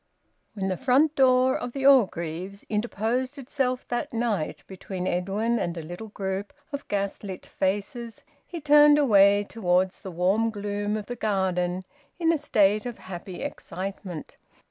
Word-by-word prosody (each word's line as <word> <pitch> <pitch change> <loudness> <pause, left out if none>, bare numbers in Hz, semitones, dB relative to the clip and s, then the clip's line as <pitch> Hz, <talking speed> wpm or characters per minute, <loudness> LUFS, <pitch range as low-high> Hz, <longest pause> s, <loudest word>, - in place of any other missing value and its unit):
When 195 -2 -2
the 185 -1 -1
front 275 +4 +3
door 260 -1 +4
of 245 - -4
the 270 -1 -3
Orgreaves 190 - +2
interposed 235 +5 -1
itself 255 -1 -2
that 245 +5 -2
night 225 -8 -2
between 190 -1 -6
Edwin 200 +6 0
and 175 0 -2
a 165 - -5
little 175 +7 -7
group 195 -1 -4 0.2
of 285 -1 -5
gas 200 -1 -2
lit 190 -3 -7
faces, 215 +5 -3 0.2
he 345 - -6
turned 295 0 +6
away 205 -7 +5
towards 185 -3 +1
the 190 - -8
warm 190 +6 +1
gloom 205 0 -2
of 210 - -5
the 245 - -5
garden 185 -4 0 0.3
in 335 -1 +3
a 320 - 0
state 210 -5 +2
of 240 - -6
happy 185 0 -8
excitement. 185 -2 -6
205 Hz, 150 wpm, -26 LUFS, 190-250 Hz, 0.3 s, turned